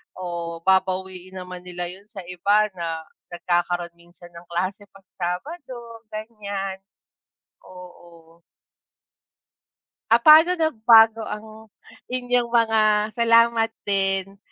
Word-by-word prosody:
o 170 -2 -6
babawiin 190 -1 0
naman 180 0 -10
nila 180 -1 -6
'yun 195 +2 -15
sa 210 -4 -9
iba 205 +4 +2
na 165 -1 -4 0.3
nagkakaroon 175 0 -1
minsan 175 0 -17
ng 170 0 -13
klase 185 +4 -3
'pag 195 -1 -18 0.2
Sabado 235 - -6
ganyan. 205 -3 -5 0.9
Oo. 170 -2 -15 1.7
Ah, 235 +1 +5
paano 320 +4 +7
nabago 225 -8 +4
ang 220 +1 -9 0.4
inyong 245 -1 0
mga 220 -2 +2
salamat 230 0 +3
din, 195 0 -1
195 Hz, 100 wpm, -23 LUFS, 180-225 Hz, 1.7 s, paano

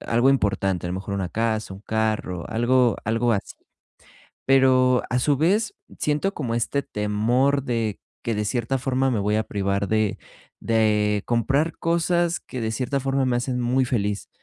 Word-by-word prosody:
algo 120 +4 +2
importante, 95 -7 0
a - - -3
lo 90 - -3
mejor 95 +1 -5
una 95 -3 -2
casa, 110 -2 -2
un 95 - -12
carro, 110 -6 -2
algo 120 0 +2
algo 115 +2 +1
así. 100 - -4 0.9
Pero 130 -2 +4
a 125 - 0
su 140 +1 +1
vez 200 +7 +1 0.2
siento 150 +7 0
como 120 -6 -3
este 130 +4 0
temor 120 +7 +1
de 115 -5 -2 0.2
que 115 - -1
de 105 0 -1
cierta 120 +4 -1
forma 130 +1 0
me 110 -4 0
voy 105 +2 +1
a 110 - +2
privar 100 -1 -1
de 110 -2 +1 0.4
de 105 -2 +2
comprar 135 +7 +1
cosas 170 +1 +1
que 130 - -7
de 110 0 -1
cierta 130 +4 -1
forma 135 0 0
me 125 -1 +1
hacen 125 0 -2
muy 125 +1 +1
feliz, 105 -4 -2
120 Hz, 170 wpm, -24 LUFS, 105-135 Hz, 0.9 s, Pero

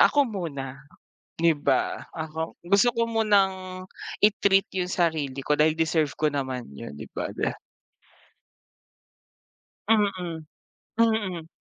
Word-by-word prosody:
"Ako 285 -1 +6
muna." 140 - -5 0.6
'di 165 0 +4
ba? - - +1 0.2
"Ako 160 0 -4
gusto 200 +7 +4
ko 230 0 0
munang 190 -4 +1 0.4
i-treat 200 -2 +4
'yong 180 -1 -2
sarili 155 -6 0
ko 150 +2 +1
dahil 155 +1 +4
deserve 160 -3 +1
ko 155 -1 +1
naman 130 -3 -2
'yon, 70 +1 -8
'di 70 - -9
ba?" - - -3
De - - 0 2.4
Mm, 210 -2 +5 0.9
mm. 205 -8 +1
170 Hz, 115 wpm, -26 LUFS, 150-200 Hz, 2.4 s, Ako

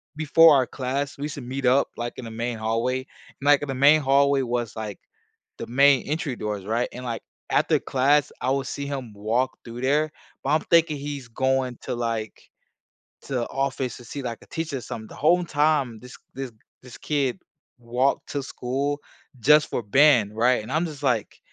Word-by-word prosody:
before 155 +1 +6
our 130 -3 +3
class, 135 +2 -3
we 140 - -6
used 150 - -5
to - - -7
meet 130 +2 -4
up, 130 +3 +4
like, 120 0 -3
in 125 - -7
the 115 - -7
main 115 +1 -3
hallway, 115 +4 0
and, 135 +1 -14
like, 145 -1 +5
in - - -3
the 135 - -2
main 145 +4 +6
hallway 140 0 +3
was, 120 -4 -2
like, 110 -3 -6 0.6
the - - -6
main 135 +1 +5
entry 150 -4 -2
doors, 105 -3 -4
right? 115 +4 0
And, 125 +1 -7
like, 115 -2 -3 0.3
after - - +3
class, 140 +2 +2
I 130 - 0
would 135 0 -1
see 140 +1 -4
him 130 -6 -5
walk 115 +6 -1
through 120 +1 -7
there, 150 +3 +2 0.3
but 135 - 0
I'm 155 +1 +3
thinking 165 -3 +4
he's 140 -2 -6
going 130 0 0
to, - - -3
like, 115 -2 -4 0.7
to 125 -3 -2
office 135 -2 -2
to 120 - -13
see, 140 +4 -6
like, 115 -2 -4
a - - -19
teacher 160 -4 -3
or 125 - -6
something. 110 -1 -7
The - - -11
home 175 +4 +3
time, 145 -7 +1
this 125 +1 -12 0.2
this 135 -2 -5 0.3
this 125 -2 -11
kid 140 -4 -1 0.4
walked 125 +3 0
to 145 - -2
school 140 +4 -2 0.4
just 150 +5 +5
for 120 - -2
band, 115 -3 +4
right? 120 0 +3
And - - -8
I'm 160 +3 +1
just 150 -3 -8
like 125 -6 0
130 Hz, 200 wpm, -24 LUFS, 120-145 Hz, 0.7 s, before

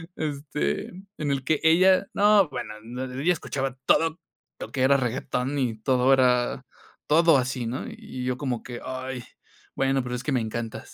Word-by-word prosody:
este, 140 - -2 0.3
en 145 -2 -1
el 135 -1 -1
que 150 +2 +1
ella 185 +4 +5
no, 205 -2 +5
bueno, 125 -5 -6
no 125 +3 -5
ella 135 +7 0
escuchaba, 135 -5 -3
todo 165 +1 +3 0.4
lo - - -7
que 130 - -2
era 140 +1 +5
regetón, 130 +2 -2
y 125 -5 0
todo 130 +1 +3
era 125 0 +2 0.4
todo 165 0 +5
así, 125 -1 -2
¿no? 120 +3 -4
Y 125 - -8
yo, 125 0 -1
como 130 -4 -2
que: 120 -1 -8
"Ay, 130 -1 -5 0.5
bueno, 135 -1 +1
pero 125 0 -5
es 125 - -3
que 150 - -2
me 125 - +2
encantas". 115 0 -5
130 Hz, 175 wpm, -25 LUFS, 125-145 Hz, 0.5 s, ella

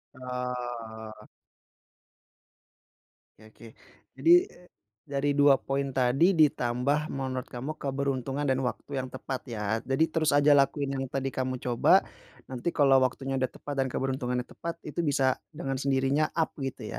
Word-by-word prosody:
Oh. 120 -3 -6 2.1
Oke 110 - -15
oke - - -14 0.5
jadi, 335 - +4 0.8
dari 140 0 0
2 145 -1 +5
poin 140 +1 -2
tadi 135 +9 +3
ditambah 140 -2 +2
menurut 130 -3 -4
kamu 130 +5 -5
keberuntungan 135 0 -2
dan 130 -1 +1
waktu 115 +4 -6
yang 130 - -4
tepat 130 0 -5
ya 110 -2 -2
jadi 135 +4 +1
terus 155 -2 +1
aja 145 +1 +5
lakuin 140 0 +3
yang 135 -1 -3
tadi 135 +1 -3
kamu 130 0 -2
coba, 120 -1 +4 0.5
nanti 125 +2 -5
kalau 135 -3 +5
waktunya 135 +1 -1
udah 130 - +1
tepat 145 -1 -5
dan 135 - +2
keberuntungannya 125 -1 -2
tepat 170 +5 -6
itu 150 +3 -6
bisa 135 -2 +1 0.2
dengan 135 -5 -3
sendirinya 135 +2 +1
up 165 -1 +1
gitu 135 -3 -5
135 Hz, 140 wpm, -28 LUFS, 125-140 Hz, 2.1 s, 2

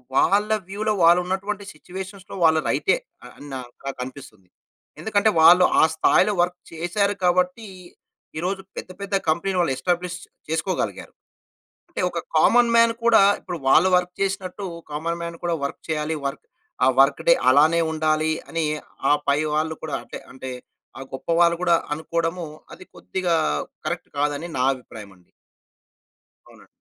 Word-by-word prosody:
వాళ్ళ 205 +8 +3 0.2
వ్యూలో 215 +2 -1
వాళ్ళున్నటువంటి 190 +4 +2
సిట్యుయేషన్స్‌లో 190 +4 -9
వాళ్ళు 160 -1 +4
రైటే, - - +2 0.4
అని 145 - -12
నా 130 - -4 0.3
నాకనిపిస్తుంది. 125 -7 -8 0.5
ఎందుకంటే, 220 0 +2
వాళ్ళు 180 +3 +8 0.2
ఆ - - +6
స్థాయిలో 205 +6 +3
వర్క్ 180 0 -4
చేసారు 200 +5 -1
కాబట్టి, 180 +5 +1 0.7
ఈరోజు 190 +3 -2 0.2
పెద్ద 185 - -6
పెద్ద 200 0 -2
కంపెనీలు 180 +4 0
వాళ్ళు 135 -6 +1
ఎస్టాబ్లిష్ 175 +5 -1 0.3
చేసుకోగలిగారు. 160 +4 -3 0.8
అంటే - - -5
ఒక - - -4 0.2
కామన్ 240 -1 +5
మ్యాన్ 230 0 +5
కూడా, 230 -3 +6 0.2
ఇప్పుడు 175 -2 -6
వాళ్ళు 165 +7 +6
వర్క్ 180 0 -1
చేసినట్టు, 195 0 -3 0.3
కామన్ 170 +3 -3
మ్యాన్ 170 0 -5
కూడా 170 -1 +1
వర్క్ 140 - -5
చేయాలి, 155 0 -1
వర్క్ 140 +2 -5 0.4
ఆ - - +4
వర్క్‌డే - - +4
అలానే 160 +4 +5
ఉండాలి, 155 0 +1 0.2
అని 165 -1 -1 0.5
ఆ - - +7 0.2
పైవాళ్లు 155 +2 +1
కూడా 160 - -3
అంటే, - - -9
అంటే 130 0 -7 0.5
ఆ - - -7
గొప్ప 135 - -8
వాళ్ళు 170 0 +5
గూడా 170 -2 +4 0.2
అనుకోడము, 165 +2 -3 0.3
అది 185 - -13
కొద్దిగా 180 -3 -1 0.5
కరెక్ట్ - - -4
కాదని 145 +3 -1
నా 125 - +2
అభిప్రాయమండి. 100 -7 -13 1.2
అవునండి. - - -18
170 Hz, 135 wpm, -23 LUFS, 155-190 Hz, 1.2 s, వాళ్ళు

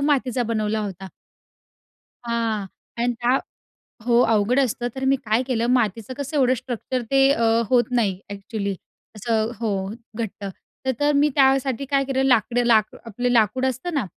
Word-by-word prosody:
मातीचा 265 -4 +1
बनवला 220 -1 -1
होता. 190 -2 -6 1.2
हां 225 -3 -1 0.3
आणि 240 +1 +1
त्या 250 +3 +3 0.7
हो, 235 -1 +4
अवघड 225 +3 +2
असतं 245 -2 0
तर 265 - -5
मी 270 +1 +4
काय 230 0 0
केलं? 240 -3 -1
मातीचं 225 0 0
कसं 285 +2 -5
एवढं 255 -1 +4
स्ट्रक्चर 250 +1 -4
ते 270 0 +5
अ, 230 -4 +1 0.3
होत 245 -2 +4
नाही 210 -7 +1
ॲक्चुअली 200 0 -4 0.4
असं 220 +1 -1
हो 230 - -1 0.5
घट्ट, 215 -3 -5 0.4
तर 260 - +2
तर 290 0 +3
मी 295 +1 +4
त्यासाठी 270 -1 +2
काय 275 0 +1
केलं 265 0 0
लाकडं 245 -1 +2
लाक 220 -2 +3
आपलं 245 +3 -2
लाकूड 245 +2 +2
असतं 260 +7 -2
ना? 275 -8 0
240 Hz, 155 wpm, -23 LUFS, 220-265 Hz, 1.2 s, ते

